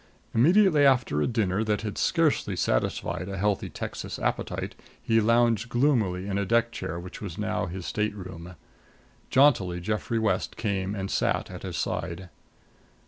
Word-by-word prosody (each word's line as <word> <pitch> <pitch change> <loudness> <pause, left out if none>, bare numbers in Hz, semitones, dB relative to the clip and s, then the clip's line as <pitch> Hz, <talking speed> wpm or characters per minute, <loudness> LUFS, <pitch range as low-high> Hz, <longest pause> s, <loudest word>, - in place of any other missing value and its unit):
Immediately 165 - +5
after 125 - +3
a - - +2
dinner 110 -4 0
that 105 -2 0
had 105 -2 -4
scarcely 155 - +1
satisfied 85 +5 -1
a 95 - -4
healthy 100 +1 0
Texas - - -6
appetite - - -2 0.3
he 115 0 +2
lounged 115 0 +3
gloomily 115 -9 +1
in 100 -1 -1
the 100 - 0
deck 115 +1 +2
chair 85 -6 -5
which 90 +1 -9
was 95 -5 -6
now 105 -2 -1
his 90 0 -6
stateroom. 95 -4 -4 0.7
Jauntily 115 -11 +4
Geoffrey 105 +5 -2
West 110 -1 0
came 100 -2 -1
and 95 -1 -4
sat - - 0
at - - -8
his - - -5
side. 85 +2 -3
105 Hz, 150 wpm, -27 LUFS, 95-115 Hz, 0.7 s, Immediately